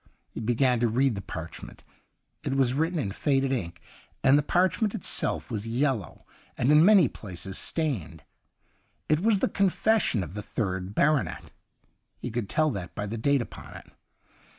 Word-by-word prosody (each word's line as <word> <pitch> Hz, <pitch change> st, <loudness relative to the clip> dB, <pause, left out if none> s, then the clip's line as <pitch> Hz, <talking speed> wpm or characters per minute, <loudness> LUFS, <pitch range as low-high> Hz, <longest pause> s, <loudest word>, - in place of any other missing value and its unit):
He -, -, -7 dB
began 120 Hz, +2 st, +2 dB
to 120 Hz, -, +2 dB
read 130 Hz, +3 st, +2 dB
the 100 Hz, -, -5 dB
parchment; 85 Hz, -3 st, -8 dB, 0.6 s
it 135 Hz, -, -2 dB
was 130 Hz, -2 st, +3 dB
written 165 Hz, +5 st, 0 dB
in 120 Hz, -10 st, -2 dB
faded 135 Hz, +4 st, 0 dB
ink, 85 Hz, -10 st, -3 dB, 0.4 s
and 135 Hz, -, +6 dB
the 145 Hz, -, +4 dB
parch 180 Hz, -, +1 dB
ment 210 Hz, -2 st, +1 dB
itself 155 Hz, -, -2 dB
was 110 Hz, -1 st, -3 dB
yellow 120 Hz, -, -1 dB, 0.3 s
and 125 Hz, +4 st, +2 dB
in 150 Hz, +1 st, +7 dB
many 195 Hz, -5 st, +6 dB
places 95 Hz, -3 st, -6 dB
stained. 105 Hz, -, -2 dB, 0.9 s
It 155 Hz, 0 st, +3 dB
was 205 Hz, 0 st, +2 dB
the -, -, +3 dB
confes 200 Hz, +3 st, +2 dB
sion 105 Hz, -6 st, 0 dB
of 90 Hz, -, -8 dB
the 105 Hz, -, -5 dB
third 95 Hz, -2 st, -3 dB
baronet 150 Hz, -1 st, +1 dB, 0.3 s
— -, -, -46 dB
he 125 Hz, -, -3 dB
could 115 Hz, -3 st, -3 dB
tell 155 Hz, -1 st, +2 dB
that 90 Hz, -7 st, -6 dB
by 105 Hz, -, -3 dB
the 110 Hz, +3 st, -4 dB
date 140 Hz, +2 st, +2 dB
upon -, -, -12 dB
it. -, -, -12 dB
130 Hz, 175 wpm, -27 LUFS, 105-150 Hz, 0.9 s, in